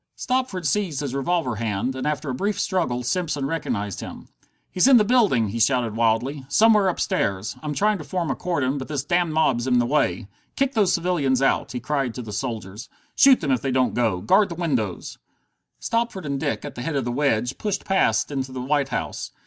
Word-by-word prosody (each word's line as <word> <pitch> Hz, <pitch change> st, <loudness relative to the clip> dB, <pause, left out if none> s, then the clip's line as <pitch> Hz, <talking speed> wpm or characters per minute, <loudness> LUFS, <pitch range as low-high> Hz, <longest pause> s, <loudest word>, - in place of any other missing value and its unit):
Stopford 250 Hz, -9 st, -2 dB
seized 160 Hz, -2 st, 0 dB
his 140 Hz, -3 st, -4 dB
revolver 140 Hz, -3 st, -1 dB
hand, 115 Hz, +3 st, -2 dB
and 130 Hz, +2 st, -3 dB
after 150 Hz, -2 st, -2 dB
a -, -, -3 dB
brief 200 Hz, +9 st, -2 dB
struggle 165 Hz, -12 st, -1 dB
Simpson 150 Hz, 0 st, -1 dB
recognized 115 Hz, -, -3 dB
him. -, -, -9 dB, 0.4 s
"He's 185 Hz, -, +3 dB
in 270 Hz, -2 st, +8 dB
the 215 Hz, -, +5 dB
building!" 205 Hz, -, +3 dB
he 115 Hz, +4 st, -4 dB
shouted 115 Hz, -1 st, +2 dB
wildly. 120 Hz, +5 st, 0 dB
"Somewhere 215 Hz, +3 st, +5 dB
upstairs! 100 Hz, -, -1 dB
I'm 150 Hz, -1 st, -4 dB
trying 210 Hz, +2 st, +1 dB
to -, -, -6 dB
form 175 Hz, +1 st, -2 dB
a -, -, -1 dB
cordon, 145 Hz, -6 st, -1 dB
but 130 Hz, -, -6 dB
this 145 Hz, -3 st, -3 dB
damned 175 Hz, +2 st, +1 dB
mob's 130 Hz, -6 st, +1 dB
in 125 Hz, -1 st, +3 dB
the 120 Hz, -, +3 dB
way. 120 Hz, -5 st, 0 dB, 0.3 s
Kick 275 Hz, 0 st, 0 dB
those 205 Hz, -6 st, +3 dB
civilians 165 Hz, -7 st, +1 dB
out!" 135 Hz, -, +1 dB
he 125 Hz, -, -3 dB
cried 135 Hz, -2 st, -2 dB
to 125 Hz, -, -5 dB
the 105 Hz, -2 st, -8 dB
soldiers. 110 Hz, -3 st, -5 dB, 0.3 s
"Shoot 270 Hz, -2 st, +6 dB
them 145 Hz, -4 st, -1 dB
if 130 Hz, -, +1 dB
they 135 Hz, -, -2 dB
don't 130 Hz, -1 st, +1 dB
go! 110 Hz, -7 st, 0 dB
Guard 190 Hz, -, +3 dB
the 170 Hz, -, -5 dB
windows!" 130 Hz, -, -2 dB, 0.6 s
Stopford 230 Hz, -6 st, -2 dB
and 140 Hz, -1 st, -2 dB
Dick, -, -, -2 dB
at -, -, -6 dB
the 120 Hz, -, -7 dB
head 150 Hz, +4 st, -3 dB
of 135 Hz, -3 st, -1 dB
the 120 Hz, -, -2 dB
wedge, 125 Hz, -2 st, 0 dB
pushed 210 Hz, -3 st, -2 dB
past 130 Hz, -, +1 dB
into 135 Hz, -2 st, -3 dB
the 130 Hz, -, -6 dB
White 140 Hz, +1 st, 0 dB
House. -, -, -4 dB
140 Hz, 210 wpm, -23 LUFS, 120-180 Hz, 0.6 s, in